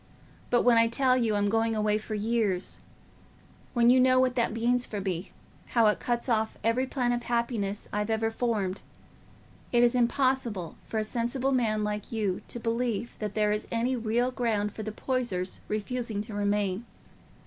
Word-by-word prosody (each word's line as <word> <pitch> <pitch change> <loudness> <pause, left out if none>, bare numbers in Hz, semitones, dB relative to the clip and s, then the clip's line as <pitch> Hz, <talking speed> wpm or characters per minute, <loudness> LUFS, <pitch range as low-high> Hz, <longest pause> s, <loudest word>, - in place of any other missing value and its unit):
But 240 - +3
when 235 -2 +6
I 230 - +5
tell 255 +2 +2
you 230 -4 +1
I'm 205 0 +1
going 225 +1 +1
away 210 0 +1
for 215 0 -5
years—when 225 +2 -2
you 255 - +5
know 255 0 +5
what 255 -1 +3
that 235 -3 +1
means 240 +2 +1
for 210 - -4
me, 185 -1 -3 0.5
how 230 - +6
it 210 - +3
cuts 240 0 -1
off 220 -2 0
every 245 +4 +1
plan 250 -2 0
of 240 0 0
happiness 235 -4 -2
I've 210 +1 -1
ever 225 0 +1
formed—it 215 -5 -1 1.0
is 240 0 +4
impossible 245 - 0
for 225 - -3
a 215 - +1
sensible 240 +4 -1
man 220 -5 +1
like 210 0 -3
you 205 -5 -1
to 240 - -6
believe 230 -1 -2
that 210 -2 -4
there 210 -1 +2
is 210 0 -2
any 235 +3 +1
real 240 +2 0
ground 220 -5 0
for 220 - -7
the 215 0 -4
Poysers 215 -7 -2
refusing 215 0 -2
to 215 0 -10
remain. 205 0 0
225 Hz, 170 wpm, -28 LUFS, 210-245 Hz, 1.0 s, when